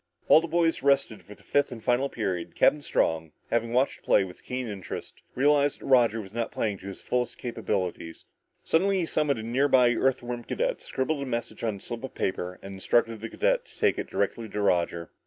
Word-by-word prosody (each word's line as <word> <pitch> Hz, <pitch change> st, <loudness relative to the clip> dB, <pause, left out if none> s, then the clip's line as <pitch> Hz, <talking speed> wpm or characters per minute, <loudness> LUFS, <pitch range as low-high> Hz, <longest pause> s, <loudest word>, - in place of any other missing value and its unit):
While 160 Hz, -, +7 dB
the 170 Hz, -, -4 dB
boys 165 Hz, 0 st, +1 dB
rested 140 Hz, -5 st, +2 dB
before 105 Hz, -, -13 dB
the -, -, -22 dB
fifth 145 Hz, -1 st, +1 dB
and 115 Hz, -3 st, -8 dB
final 125 Hz, +3 st, +2 dB
period, 95 Hz, -8 st, -3 dB
Captain 150 Hz, -, +4 dB
Strong, 80 Hz, -, 0 dB, 0.2 s
having 115 Hz, 0 st, +1 dB
watched 130 Hz, +3 st, +2 dB
the -, -, -26 dB
play -, -, +4 dB
with 90 Hz, -1 st, -10 dB
keen 125 Hz, -1 st, -4 dB
interest, 100 Hz, -4 st, -7 dB
realized 145 Hz, +1 st, +3 dB
that -, -, -11 dB
Roger 120 Hz, -4 st, +4 dB
was 100 Hz, -2 st, -9 dB
not 115 Hz, 0 st, -2 dB
playing 105 Hz, -3 st, -1 dB
up -, -, -19 dB
to 95 Hz, -, -9 dB
his 100 Hz, -, -8 dB
fullest 125 Hz, 0 st, -1 dB
capabilities. 95 Hz, -8 st, -3 dB, 0.4 s
Suddenly 190 Hz, +3 st, +2 dB
he -, -, 0 dB
summoned 150 Hz, -4 st, +1 dB
a 110 Hz, -, -5 dB
near 125 Hz, +5 st, +2 dB
by 125 Hz, -3 st, +5 dB
Earthworm 120 Hz, -1 st, -1 dB
cadet, -, -, -2 dB
scribbled 140 Hz, +2 st, -2 dB
a -, -, -2 dB
message 120 Hz, -2 st, -4 dB
on 110 Hz, -3 st, 0 dB
a -, -, -10 dB
slip 115 Hz, +4 st, -7 dB
of 130 Hz, -, -7 dB
paper 90 Hz, -1 st, -2 dB
and 95 Hz, 0 st, -7 dB
instructed 115 Hz, +3 st, +1 dB
the 115 Hz, -, -5 dB
cadet -, -, +1 dB
to -, -, -17 dB
take -, -, +2 dB
it -, -, -4 dB
directly 115 Hz, -2 st, -2 dB
to 105 Hz, -, -4 dB
Roger. 85 Hz, -4 st, 0 dB
120 Hz, 220 wpm, -27 LUFS, 105-140 Hz, 0.4 s, While